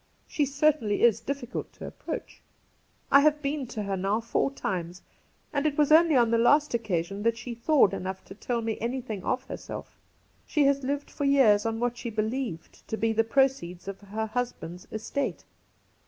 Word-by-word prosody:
She 290 -2 0
certainly 280 -6 +1
is 230 -2 +5
difficult 275 -3 -5
to - - -9
approach. - - -7 0.7
I 280 - +9
have 300 +1 +4
been 280 -1 -2
to 220 -3 -4
her 200 -1 -2
now 195 +3 0
four 230 +3 0
times, 180 -9 -4 0.5
and 285 +1 +1
it 290 - -2
was 300 -1 +3
only 320 -1 +6
on 235 -3 +4
the 230 - +3
last 290 +5 +4
occasion 200 -4 -1
that 230 +1 +1
she 240 0 -6
thawed 235 -1 +3
enough 190 +1 -5
to - - -10
tell 235 +3 -3
me 225 -1 -2
anything 235 -4 -3
of 255 - -1
herself - - -8 0.5
She 300 - +2
has 275 0 +3
lived 280 +2 -3
for 285 - -3
years 230 -7 +5
on 225 0 -2
what 240 0 -1
she 235 - -4
believed 220 -4 -4
to 220 - -3
be 225 0 +1
the 225 +1 +3
proceeds 225 -8 0
of 195 0 -6
her 210 +2 -3
husband's 215 -7 -4
estate. 225 +6 -3
235 Hz, 185 wpm, -27 LUFS, 210-275 Hz, 0.7 s, I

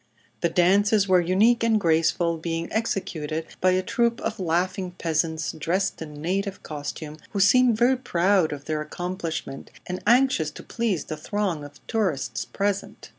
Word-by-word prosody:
The 170 - +1
dances 200 +4 +3
were 185 -1 +5
unique 205 +8 +3
and 225 -2 +3
graceful, 165 -1 +2
being 165 0 -3
executed 165 -8 -2 0.2
by 185 - +4
a 185 0 +1
troup 235 +4 +1
of 225 -2 -3
laughing 180 +1 -1
peasants 160 -1 -1
dressed 170 +5 -1
in 150 -2 -8
native 195 +5 -2
costume, 150 +1 -6 0.2
who 200 - -1
seemed 240 +3 +5
very 250 +3 +4
proud 185 -6 +2
of 145 -1 -6
their 155 0 -2
accomplishment 165 -3 -5 0.2
and 180 0 -5
anxious 245 - +4
to - - -11
please 225 -8 -1
the 155 - -5
throng 180 -1 -2
of 145 0 -13
tourists 140 - -1
present. 200 0 -3
180 Hz, 155 wpm, -25 LUFS, 160-205 Hz, 0.2 s, were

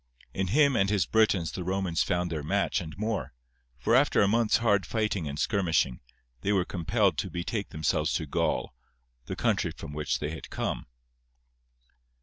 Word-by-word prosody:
In 95 0 -1
him 140 +6 +4
and 100 -3 +2
his 100 -6 +2
Britons 100 -8 +2
the 90 - -5
Romans 95 -2 0
found 90 -1 0
their 80 -2 -2
match 100 +6 0
and 80 -2 -8
more, 110 - -2 0.4
for 65 - 0
after - - +5
a - - +3
month's 115 +1 +3
hard 105 -4 +2
fighting 105 -7 -1
and 70 0 -5
skirmishing, 85 - +1 0.4
they 100 - 0
were 95 -3 +2
compelled 85 -5 +1
to - - -2
betake 100 +4 -3
themselves 80 -1 0
to - - -1
Gaul, - - -1 0.5
the - - -3
country - - +1
from 75 - -8
which 75 0 -1
they 75 - -3
had 80 - -8
come. - - -3
95 Hz, 170 wpm, -28 LUFS, 80-105 Hz, 0.5 s, after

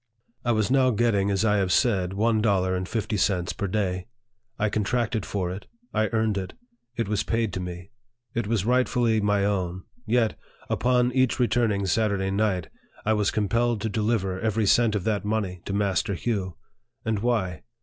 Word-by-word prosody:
I 120 - +1
was 110 +1 +1
now 130 -1 +4
getting, 105 -4 +2
as 100 +2 +1
I 105 -1 +3
have 95 -2 +1
said, 95 -7 +2
one 110 +2 +2
dollar 95 -4 +2
and 90 0 -3
fifty 110 -1 -1
cents 90 -3 +1
per 100 - -3
day. 90 -2 -1 0.5
I 110 - +1
contracted 110 +1 -1
for 90 -3 -2
it; 95 +2 -7 0.3
I 110 0 +2
earned 110 -2 0
it; 95 - -6 0.4
it 115 -3 -1
was 105 0 0
paid 115 -1 -1
to 95 - -3
me; 90 0 -7 0.4
it 115 -3 -1
was 110 -3 0
rightfully 120 -2 +2
my 105 -1 +2
owh; 95 -2 -1 0.2
yet, 115 -1 +1 0.3
upon 125 0 +2
each 130 0 +2
returning 115 -5 +2
Saturday 95 0 +1
night, 100 -4 0 0.4
I 110 - +3
was 105 -2 +2
compelled 115 +2 +1
to 110 - -1
deliver 105 -3 0
every 110 +1 0
cent 110 +1 +4
of 100 - -1
that 105 -1 0
money 105 -4 -2
to 100 - -3
Master 100 0 0
Hugh. 95 -4 -2 0.5
And 110 -2 0
why 105 -8 0
105 Hz, 180 wpm, -25 LUFS, 95-115 Hz, 0.5 s, now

